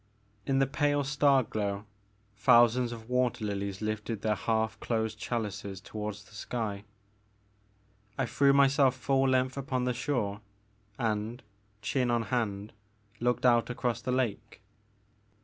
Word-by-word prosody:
In 135 - +2
the 135 - +4
pale 145 +1 +1
star 140 -1 +3
glow 100 -2 -3 0.5
thousands 120 +1 +5
of 115 -1 -8
water 125 -3 0
lilies 100 0 -3
lifted 110 0 -3
their 110 -1 +2
half 110 +1 -1
closed 110 -2 -2
chalices 100 -5 -4
toward 105 +1 -5
the 105 +1 -16
sky. 105 -1 -4 1.3
I - - +1
threw 140 0 +3
myself 140 -1 +4
full 135 +1 +1
length 130 0 +1
upon 130 -2 -1
the 125 0 0
shore, 120 -6 -2 0.6
and, 110 +2 -2 0.4
chin 125 +2 0
on 120 -1 +2
hand, 105 -3 -1 0.5
looked 125 +1 0
out 120 -1 +4
across 125 -2 -2
the 125 - -2
lake. 115 -4 -2
120 Hz, 130 wpm, -30 LUFS, 105-130 Hz, 1.3 s, thousands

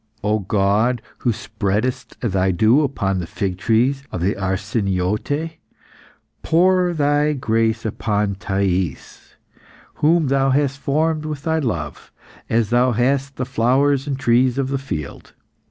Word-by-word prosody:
O 105 +1 +1
God, 105 +4 +1 0.2
who 120 - +1
spreadest 110 +3 -3
Thy 95 -5 +1
dew 110 - +4
upon 100 -10 -1
the 85 - -4
fig 95 -1 -3
trees 125 +6 +1
of 90 - -4
the 95 +4 +1
Arsiniote, 100 - -2 0.8
pour 180 +2 +3
Thy 145 -1 +2
grace 115 -4 0
upon 105 -2 -1
Thais, 95 -5 -3 0.7
whom 160 +2 +4
Thou 135 0 +2
hast 140 0 +1
formed 155 +2 0
with 150 -2 -5
Thy 160 0 +1
love, 85 - -4 0.4
as 115 -1 +1
Thou 125 +1 +3
hast 135 +4 0
the 125 - -3
flowers 135 +3 +1
and 140 -2 -2
trees 125 0 +2
of 135 -1 -1
the 135 0 -1
field. 80 - -6
120 Hz, 135 wpm, -20 LUFS, 100-140 Hz, 0.8 s, dew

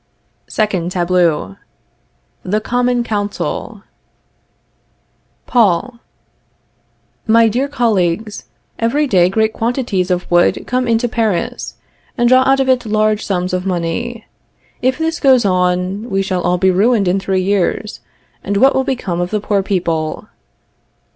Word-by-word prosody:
SECOND 190 -6 -1
TABLEAU. 175 - 0 0.8
The 210 +4 -1
Common 245 +2 0
Council. 205 -3 -4 1.6
Paul. 235 +1 +1 1.3
My 225 +1 +5
dear 250 +6 0
colleagues, 215 -5 -1 0.3
every 265 +7 +1
day 185 -9 +3
great 220 +2 +1
quantities 225 -6 -1
of 180 0 -1
wood 175 0 +3
come 255 0 -1
into 230 +1 +1
Paris, 225 -6 -2 0.4
and 240 -1 +2
draw 255 +1 +5
out 270 0 +3
of 270 - +1
it 255 -2 +2
large 215 0 +1
sums 185 -1 -2
of 185 +1 -2
money. 195 +7 -3 0.6
If 255 0 +1
this 325 +1 -2
goes 260 -5 +4
on, 185 +3 0
we 195 -1 0
shall 185 -2 -2
all 180 +1 +1
be 190 +1 +3
ruined 205 +2 +2
in 185 +2 +1
three 190 -1 -1
years, 200 - -1 0.4
and 200 +1 -1
what 270 +5 +5
will 265 - +1
become 195 -10 -2
of 175 - -2
the 215 - -1
poor 205 -1 0
people? 170 -5 -2
210 Hz, 135 wpm, -16 LUFS, 180-240 Hz, 1.6 s, My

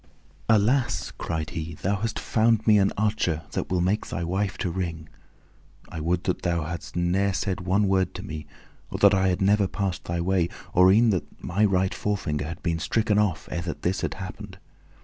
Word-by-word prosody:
"Alas!" 115 -1 +2
cried 80 -2 -3
he, 80 0 -5
"thou 100 +5 -1
hast 115 +3 -3
found 110 -1 +2
me 105 -2 +6
an 100 0 +3
archer 100 -7 0
that - - -3
will 90 -1 +1
make 95 +4 0
thy 85 - -3
wife 95 +3 -1
to 90 - -2
wring! 85 -3 -4 0.8
I 80 - -6
would 85 +3 0
that 90 - -1
thou 85 -2 0
hadst 80 +1 -6
ne'er 95 +3 +1
said 95 0 -2
one 95 +3 +2
word 95 -1 +1
to - - -6
me, 75 0 -7 0.4
or - - -4
that 100 0 +6
I 95 0 +3
had 90 +1 +1
never 100 0 +4
passed 95 -1 -3
thy 85 0 -2
way, 90 -1 +1 0.2
or 90 +1 +6
e'en 110 +3 +5
that 90 -5 -4
my 95 +4 0
right 95 -1 +1
forefinger 75 -9 -2
had 85 +2 -7
been 85 -1 0
stricken 105 +4 +1
off 95 -7 0
ere 85 - -2
that 85 -2 -6
this 90 +2 0
had - - -2
happened! 95 +1 -8
95 Hz, 200 wpm, -25 LUFS, 85-100 Hz, 0.8 s, me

